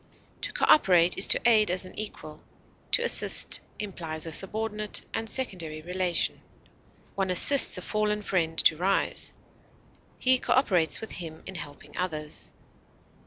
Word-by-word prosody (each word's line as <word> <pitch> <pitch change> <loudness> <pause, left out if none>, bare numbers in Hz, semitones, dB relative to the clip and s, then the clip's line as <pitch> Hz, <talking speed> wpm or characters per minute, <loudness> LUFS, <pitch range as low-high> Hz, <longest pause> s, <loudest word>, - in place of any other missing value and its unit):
To - - -4
cooperate 180 - +3
is 190 - +5
to - - +3
aid 215 -4 +4
as 185 +1 -3
an 185 - -12
equal; 155 -7 -8 0.5
to 480 - +3
assist 475 - +3 0.2
implies 165 -6 -6
a 165 - -7
subordinate 210 +4 -2
and 225 0 -4
secondary 170 -12 -3
relation. 180 0 -2 0.7
One 195 -1 -3
assists 230 +7 +8
a 180 - -8
fallen 210 -1 -2
friend 165 -5 -2
to 155 - +3
rise; 190 +3 -2 0.8
he 255 0 +2
cooperates 185 - 0
with 220 - -8
him 160 -2 -9
in - - -8
helping 145 -5 -11
others. 155 -4 -4
185 Hz, 135 wpm, -26 LUFS, 165-215 Hz, 0.8 s, assists